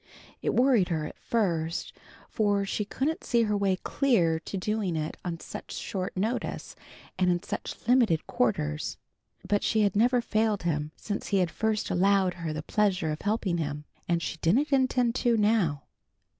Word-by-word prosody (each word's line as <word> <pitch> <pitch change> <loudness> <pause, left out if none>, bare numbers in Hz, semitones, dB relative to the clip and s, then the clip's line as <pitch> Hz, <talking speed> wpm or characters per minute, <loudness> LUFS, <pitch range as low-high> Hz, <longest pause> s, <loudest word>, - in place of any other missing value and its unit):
It - - 0
worried 245 -7 +4
her 160 -3 -1
at - - -9
first, 170 -7 -1 0.3
for 205 -2 +1
she 210 +1 -2
couldn't 290 +9 -2
see 235 -2 +2
her 210 -1 +1
way 200 -2 +2
clear 185 - +1
to 195 - -6
doing 200 -2 -1
it 155 0 -3
on 170 -2 -4
such - - -8
short 185 -1 -4
notice 220 +6 -2 0.4
and 180 -1 +3
in 175 +1 +1
such - - -4
limited 235 -10 +3
quarters. 75 -11 -1 0.5
But 205 0 +2
she 220 - +2
had 205 -2 +2
never 245 +4 +4
failed 220 -3 0
him 150 -3 -1
since 205 -2 -4
he 200 - +1
had 180 -3 +1
first 220 -1 -1
allowed 190 0 +3
her 170 -3 -4
the 155 0 -4
pleasure 185 -5 +1
of 155 - -5
helping 205 -4 0
him, 150 -1 -3 0.2
and 170 -1 +1
she - - -3
didn't 250 - +2
intend 255 -3 +2
to 240 -2 +2
now. 205 -9 +2
200 Hz, 170 wpm, -28 LUFS, 165-220 Hz, 0.5 s, worried